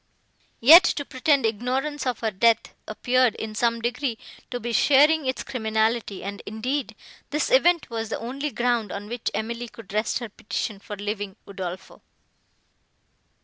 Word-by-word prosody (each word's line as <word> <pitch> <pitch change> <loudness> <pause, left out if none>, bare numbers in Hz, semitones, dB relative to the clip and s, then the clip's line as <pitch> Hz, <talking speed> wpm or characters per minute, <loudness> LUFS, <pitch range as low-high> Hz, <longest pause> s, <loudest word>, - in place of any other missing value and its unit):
Yet, 315 +9 +10
to 285 -4 0
pretend 270 0 +1
ignorance 260 +6 -1
of 250 - -2
her 220 -1 0
death, 225 +4 +2
appeared, 245 +2 +2
in 220 -1 -6
some 230 +1 0
degree, 245 0 -1 0.3
to 245 - -4
be 240 +1 -4
sharing 295 +3 +4
its 260 - -2
criminality, 220 -3 -1
and, 200 +1 -6
indeed, 225 +2 -3 0.3
this 300 +10 -1
event 350 -9 +4
was 225 -1 -3
the - - -2
only 270 +6 -4
ground, 240 -5 0
on 205 +1 -6
which 240 +1 -3
Emily 230 +3 -3
could 220 -4 -13
rest 215 +1 0
her 235 -2 -6
petition 210 0 -4
for 205 +1 -8
leaving 205 -1 -4
Udolpho. 185 -2 -7
235 Hz, 150 wpm, -24 LUFS, 215-260 Hz, 0.3 s, Yet